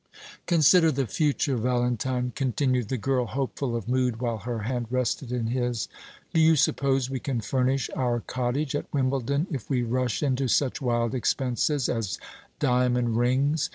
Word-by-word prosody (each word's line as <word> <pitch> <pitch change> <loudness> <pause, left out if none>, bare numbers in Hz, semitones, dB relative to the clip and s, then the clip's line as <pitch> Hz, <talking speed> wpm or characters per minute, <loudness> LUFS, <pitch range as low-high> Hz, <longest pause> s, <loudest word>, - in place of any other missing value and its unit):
"Consider 165 0 +5
the 135 -1 0
future, 140 +2 0
Valentine," 125 +1 0
continued 130 -3 0
the 130 - -1
girl, 125 +1 0
hopeful 135 0 -2
of 115 -2 -4
mood 125 -2 0
while 115 -2 -2
her 115 +1 -4
hand 120 0 -2
rested 125 0 -1
in 125 -2 -1
his. 120 -1 -1 0.5
"Do 160 - +4
you 160 0 +6
suppose 135 -2 +2
we 130 - -2
can 130 -3 -2
furnish 130 +3 0
our 120 -2 0
cottage 130 +5 -2
at 145 - -4
Wimbledon 135 +2 0
if 130 -8 -5
we 125 -3 +1
rush 120 -1 -1
into 135 -1 +1
such 130 +3 +1
wild 120 -2 0
expenses 130 +2 0
as 110 -5 -2 0.4
diamond 125 -3 +1
rings? 135 +6 +1
125 Hz, 155 wpm, -26 LUFS, 120-135 Hz, 0.5 s, you